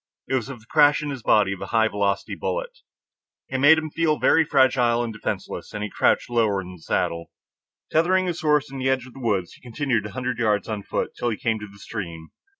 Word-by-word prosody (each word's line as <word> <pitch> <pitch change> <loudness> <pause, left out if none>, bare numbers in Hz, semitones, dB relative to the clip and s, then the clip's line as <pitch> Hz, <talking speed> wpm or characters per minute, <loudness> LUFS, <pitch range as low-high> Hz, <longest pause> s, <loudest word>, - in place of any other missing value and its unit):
It - - -3
was 130 -1 0
of 135 -3 -7
the - - -21
crash 145 +3 +4
into 145 - -3
his 135 -3 -6
body 105 -3 +3
of 95 - -9
a - - -5
high 110 -1 +3
velocity 100 -2 -1
bullet. - - -4 0.7
It 130 - -2
made 145 +4 +7
him 155 -1 -3
feel 155 -2 +1
very 165 - +4
fragile 130 -4 +3
and 115 -2 -4
defenseless, 105 - -5
and 105 - -3
he 105 - -4
crouched - - +2
lower 110 -5 +1
in 90 -1 -7
the 90 - -12
saddle. 85 +1 -2 0.6
Tethering 185 +4 +3
his 175 -2 -3
horse 150 -2 +2
in 135 - -6
the 130 0 0
edge 130 -1 0
of 130 - -14
the - - -11
wood, 105 -7 0
he - - -18
continued 125 -3 -1
a - - -10
hundred 125 -1 -3
yards 105 -4 +1
on 110 -2 -3
foot - - -3
till 120 - -1
he 110 - -2
came 115 -2 -1
to 105 - -7
the 100 - -16
stream. 85 -6 -7
120 Hz, 240 wpm, -24 LUFS, 105-145 Hz, 0.7 s, made